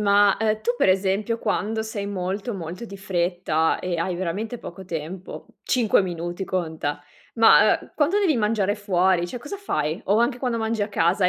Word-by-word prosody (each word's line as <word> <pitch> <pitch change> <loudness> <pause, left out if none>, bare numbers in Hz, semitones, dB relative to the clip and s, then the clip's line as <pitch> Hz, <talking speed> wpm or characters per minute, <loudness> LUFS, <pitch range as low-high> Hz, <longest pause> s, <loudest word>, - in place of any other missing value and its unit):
ma, 205 -1 +4
ehm, 215 -1 +1
tu, 240 +3 0
per - - +3
esempio, 195 +4 +1
quando 220 0 -1
sei 215 -2 -4
molto, 200 +4 -3
molto 180 +4 -6
di 200 -3 -9
fretta 175 -4 0
e 180 -1 -2
hai 175 +2 -1
veramente 200 +7 -3
poco 190 -1 -9
tempo, 175 +2 -6 0.2
5 230 -5 +3
minuti, 175 +1 -4
conta, 160 -6 -3 0.3
ma, 225 -1 +6
uhm, - - -16
quando 320 +7 +2
devi 365 -9 +2
mangiare 210 -2 +1
fuori, 185 -4 +2
cioè, 245 - -6
cosa 290 +11 -7
fai? 155 - -2
O 205 +3 +3
anche 240 +2 +1
quando 245 -3 -1
mangi 220 -1 -1
a 205 - -1
casa 185 0 +2
e - - +6
200 Hz, 185 wpm, -24 LUFS, 175-225 Hz, 0.3 s, ma